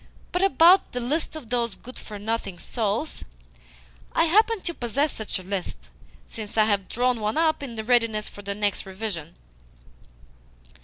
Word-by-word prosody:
But 360 - 0
about 370 -1 +6
the 250 - -1
list 295 +7 -1
of 260 -7 -9
those 235 -3 +1
good 255 +2 -10
for 210 - -8
nothing 205 -3 -2
souls 225 - -2 0.9
I 330 - +4
happen 435 +6 +4
to 340 - -2
possess 275 +3 0
such 220 -2 -3
a 185 - -8
list, 180 - -4 0.4
since 215 -1 -7
I 215 - +6
have 200 -3 0
drawn 245 0 +1
one 215 +5 -1
up 315 -2 +2
in 260 -5 -6
readiness 230 -3 +2
for 205 - -8
the 200 0 -3
next 205 -2 -1
revision." 190 -5 -4
230 Hz, 160 wpm, -25 LUFS, 205-290 Hz, 0.9 s, about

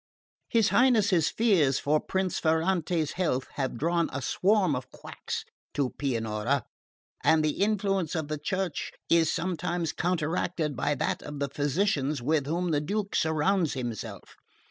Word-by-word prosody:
"His 225 -2 +3
Highness's 210 - +4
fears 180 - +3
for 150 +2 +2
Prince 190 +1 -1
Ferrante's 160 -1 +1
health 155 -8 -1
have 130 -4 -2
drawn 170 +4 +1
a 130 - -3
swarm 185 - +2
of 125 0 -5
quacks - - -6 0.3
to 140 -3 0
Pianura, 115 -1 -1 0.6
and 160 -1 +4
the 155 +4 -1
influence 195 -5 +1
of 160 -3 -2
the 155 0 -3
Church 185 -1 -2 0.2
is 165 -2 +4
sometimes 175 -1 -2
counteracted 170 -2 -1
by 145 +4 0
that - - -1
of 145 0 -7
the 140 0 -2
physicians 145 0 0
with 140 +2 0
whom 170 +3 -1
the 145 -2 +2
Duke 200 +5 -2
surrounds 160 +2 +2
himself. 120 -4 -6
160 Hz, 145 wpm, -28 LUFS, 145-185 Hz, 0.6 s, Highness's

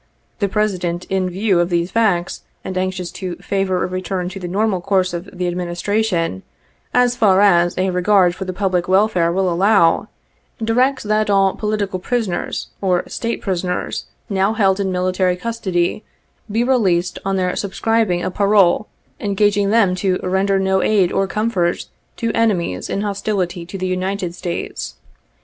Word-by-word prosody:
The 200 -3 +1
President 180 -4 -1
in 190 -1 +1
view 190 0 +1
of 175 0 +1
these 170 0 0
facts, 195 -6 +1 0.2
and 185 - -5
anxious 185 -1 -2
to 180 -2 -5
favor 195 -2 -1
a - - 0
return 185 0 -3
to 195 +1 -8
the 180 - -5
normal 195 0 0
course 185 -1 +1
of 175 +3 -5
the 180 -1 -3
administration, 175 - -1 0.5
as 245 0 +3
far 205 -6 +4
as 175 -4 +4
a 185 0 +1
regard 180 0 +3
for 190 +1 -6
the 185 - -3
public 185 -2 -1
welfare 185 -3 +3
will 190 +2 +1
allow, 185 0 +3 0.5
directs 250 +4 +1
that 215 0 +1
all 195 -1 +3
political 210 -3 -2
prisoners 210 -3 -2
or 185 -3 +1
State 230 0 -3
prisoners 180 -2 -2 0.2
now 195 +1 +1
held 195 -3 +2
in 195 -1 0
military 185 0 +1
custody 190 -3 -2 0.5
be 225 +3 +1
released 190 -9 +1
on 195 0 -1
their 185 -1 0
subscribing 205 -2 0
a 185 - -2
parole 200 0 +3 0.3
engaging 205 0 +1
them 210 -4 +3
to 185 -1 +1
render 190 +2 +1
no 190 0 +1
aid 200 -5 +2
or 195 - +1
com 215 +3 -1
74 180 -6 +1
fort - - -9 0.3
to 230 -1 -1
enemies 185 - 0
in 200 - -1
hostility 195 -4 -2
to 195 - -6
the 185 - -3
United 185 -1 -2
States. 170 - -5
190 Hz, 165 wpm, -19 LUFS, 180-205 Hz, 0.5 s, far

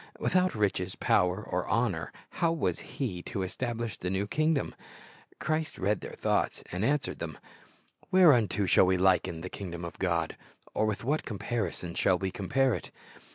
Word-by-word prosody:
Without 185 0 +2
riches, 95 -3 0
power, 90 +2 +2
or - - -2
honor, - - 0 0.3
how 165 -1 +4
was 165 -2 0
He 105 -11 -4
to 95 - -2
establish 115 +2 -3
the 90 - -2
new 95 +2 0
kingdom? 155 +5 +1 0.6
Christ 155 +1 -1
read 100 +2 0
their - - -7
thoughts - - 0
and 90 +3 -2
answered 140 +4 0
them: 80 -4 -5 0.4
— - - -31
"Whereunto 135 - +5
shall 95 - +5
we 95 0 +3
liken 90 -2 +2
the 90 - -4
kingdom 85 -3 -6
of 85 - -8
God? 85 -3 0 0.4
or 110 - +1
with 105 0 -2
what 150 +6 0
comparison 100 -5 -3
shall 90 - +3
we 95 +1 -2
compare 130 +7 +1
it?" - - -4
100 Hz, 165 wpm, -30 LUFS, 90-135 Hz, 0.6 s, Whereunto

